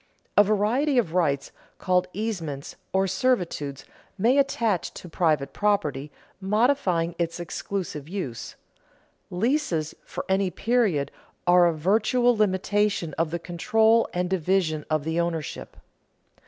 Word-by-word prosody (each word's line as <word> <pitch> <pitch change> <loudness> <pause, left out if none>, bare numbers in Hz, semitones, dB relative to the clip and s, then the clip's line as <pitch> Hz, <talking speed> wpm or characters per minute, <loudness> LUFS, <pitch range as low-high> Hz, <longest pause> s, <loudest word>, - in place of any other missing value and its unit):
_ - - -38 0.3
A 205 - +8
variety 220 +8 +1
of 180 -10 +1
rights 150 -6 0 0.3
called 180 0 +1
easements 175 -10 -4 0.2
or 190 0 +2
servitudes 180 - -1 0.3
may 240 +8 +3
attach 230 -9 0
to - - -9
private 155 -5 0
property, 150 -9 0 0.3
modifying 195 -5 +1
its 170 0 -2
exclusive 175 -3 -5
use. 175 - -5 0.7
Leases 180 - 0
for - - -6
any 190 0 +1
period 195 - +1 0.3
are 175 0 +6
a - - +3
virtual 220 +8 +2
limitation 205 -4 +1
of 165 -1 +1
the 170 - -2
control 220 +7 +2
and 180 0 -1
division 180 -4 0
of 155 -2 0
the 160 +2 -1
ownership. 165 -4 -3
185 Hz, 125 wpm, -25 LUFS, 165-215 Hz, 0.7 s, A